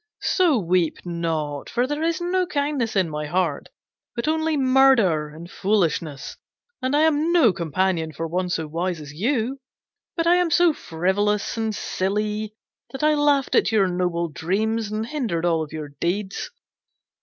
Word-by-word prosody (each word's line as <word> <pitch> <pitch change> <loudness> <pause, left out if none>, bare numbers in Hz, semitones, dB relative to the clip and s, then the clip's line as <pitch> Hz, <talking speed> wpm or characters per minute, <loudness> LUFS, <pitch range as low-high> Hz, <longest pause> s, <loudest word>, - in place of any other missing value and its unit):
'So 350 -8 +3
weep 180 -4 +1
not, 160 -4 -3
for 245 +1 +1
there 295 +3 -3
is 330 0 0
no 360 +1 0
kindness 285 -8 -1
in 190 -3 +2
my 150 -1 -4
heart, 170 -3 -1 0.5
but 235 +4 -3
only 315 0 +1
murder 255 - +4
and 165 +3 -11
foolishness, 170 -7 -1 0.4
and 260 +2 0
I 295 - +4
am 315 +1 +2
no 300 - +5
companion 170 -1 -1
for 160 +2 -5
one 180 +2 -2
so 165 -2 -1
wise 170 +3 -2
as 145 -1 -9
you, 240 - -1 0.6
but 330 - +1
am 350 0 +4
so 345 0 +4
frivolous 200 - -1
and 220 -2 -2
silly 210 +3 -2 0.3
that 270 +2 -6
I 305 0 +4
laughed 290 -2 +2
at - - +3
your 205 -4 +3
noble 175 -1 -1
dreams 205 - -1
and 215 +1 -2
hindered 230 - -2
all 165 -2 +1
your 155 -2 -6
deeds. 190 +3 -2
205 Hz, 155 wpm, -23 LUFS, 170-275 Hz, 0.6 s, no